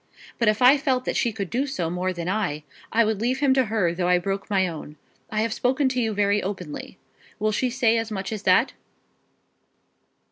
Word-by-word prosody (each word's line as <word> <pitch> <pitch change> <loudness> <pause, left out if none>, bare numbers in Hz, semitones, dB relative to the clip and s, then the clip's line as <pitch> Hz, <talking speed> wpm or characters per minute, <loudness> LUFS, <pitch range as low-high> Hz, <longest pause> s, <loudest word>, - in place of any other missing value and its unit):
But 230 - +2
if 215 +3 +2
I 270 +3 +7
felt 260 -3 0
that - - -2
she 235 - +1
could 200 -4 -5
do 260 +5 0
so 185 -12 -2
more 180 +1 -1
than 175 -1 -5
I, 185 -7 -1 0.3
I 230 +1 +4
would 215 -1 -1
leave 255 +3 0
him 280 -2 +3
to 260 -1 +3
her, 200 -6 0
though 175 0 -1
I 180 0 +4
broke 195 +2 -3
my 190 -2 +2
own. 155 -3 -8 0.3
I 215 0 -1
have 225 0 0
spoken 260 +2 +1
to 255 -1 -1
you 225 -1 0
very 205 0 +1
openly. 185 -3 -6 0.4
Will 215 +1 0
she 250 +4 0
say 235 -2 +2
as 225 0 -4
much 195 -2 -4
as 215 - -5
that?" 195 +6 +3
215 Hz, 215 wpm, -24 LUFS, 185-245 Hz, 0.4 s, I